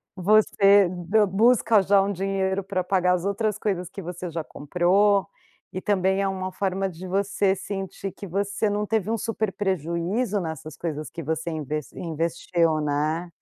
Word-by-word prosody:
Você 200 0 +5
d 185 +4 +1
busca 220 +2 +4
já 195 +1 +4
um 200 - -1
dinheiro 195 0 -1
para 185 -1 -2
pagar 180 0 +2
as 180 0 -1
outras 205 +1 0
coisas 185 -5 -2
que - - -9
você 180 0 -6
já 165 -1 -4
comprou 185 +7 +2 0.5
e, 185 - -4
também, 190 -1 +1
é 195 - +1
uma 185 -1 -3
forma 195 0 -1
de 185 0 -8
você 195 +1 +1
sentir 195 0 -5
que 200 +2 -9
você 200 +3 -1
não 205 +1 -1
teve 215 -1 -1
um 230 - 0
super 220 -2 -2
prejuízo 190 - -1
nessas 160 -3 -6
coisas 155 -2 -4
que 165 - -7
você, 160 +3 -2
inve 155 -2 -3 0.2
investiu, 165 0 0
né. 155 +3 -1
190 Hz, 165 wpm, -25 LUFS, 170-200 Hz, 0.5 s, Você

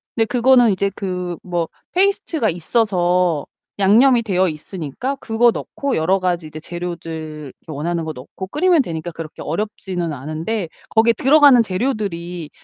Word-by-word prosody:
근데 225 - +3
그거는 245 -1 +4
이제 195 +1 0
그 180 -3 -3
뭐 175 -2 -2 0.2
페이스트가 360 - +1
있어서 180 - +1 0.3
양념이 235 +5 +5
되어 190 -3 +1
있으니까 165 - -4
그거 235 -2 +2
넣고 280 +3 -3
여러 185 +5 +2
가지 175 -3 -1
이제 155 +1 -9
재료들 160 -4 -6
이렇게 160 - -12
원하는 165 +3 -2
거 155 - -4
넣고 145 +9 -9
끓이면 330 - +3
되니까 170 -4 -5
그렇게 165 -1 -8
어렵지는 180 -2 -3
않은데 160 - -4 0.2
거기에 230 +1 +4
들어가는 280 -2 +6
재료들이 185 - -3
185 Hz, 355 characters per minute, -20 LUFS, 165-230 Hz, 0.3 s, 들어가는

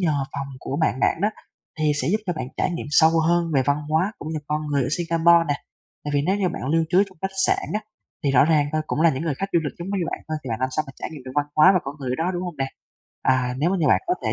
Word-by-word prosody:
nhờ 150 -6 +1
phòng 140 -1 -4
của 140 - -4
bạn 135 -4 +1
bạn - - +2
đó 205 - +4 0.5
thì 155 -1 +2
sẽ - - -1
giúp 215 - +2
cho 180 - 0
bạn 155 -6 -5
trải - - 0
nghiệm 170 -3 -4
sâu 160 +1 +6 0.2
hơn 175 0 +3
về 135 - +4
văn 145 +2 +1
hóa 165 +7 +1
cũng 155 - -7
như 155 - -2
con 150 0 -2
người 145 -2 +1
ở 125 - -1
Singapore 170 0 +4
nè. 145 - +2 0.5
Tại 145 - -3
vì 140 - +2
nếu 190 - +2
như 195 -3 +1
bạn 175 - -5
lưu 165 +1 +2
trú 185 +3 +5
trong 185 -4 -19
khách 195 0 -3
sạn - - +1
á, 210 - 0 0.4
thì 140 - +3
rõ 135 - +5
ràng 150 -2 +3
thôi, 155 0 0
cũng 155 - -2
là 165 0 +6
những 135 +1 -3
người 160 -4 -1
khách 195 +8 -3
du 170 - +4
lịch 145 - -3
giống 175 - -6
như 195 -3 -1
bạn - - -4
thôi, 155 - -1
thì - - -5
bạn 110 - -3
làm 130 - +1
sao 155 - +1
mà 135 - -9
trải - - -5
nghiệm 150 -4 -9
được 130 - -8
văn 145 0 +1
hóa 155 +5 +8
và 185 - +4
con 140 +1 -5
người 130 -3 -4
ở 130 - -2
đó, 180 - +1
đúng 175 - -2
hông 175 -4 -5
nè? 135 -1 -1 0.6
À, 125 -1 +2
nếu 160 +5 +2
mà 195 - +1
như 150 - +2
bạn - - +4
có 360 - +2
thể - - +1
155 Hz, 320 wpm, -23 LUFS, 140-175 Hz, 0.6 s, hóa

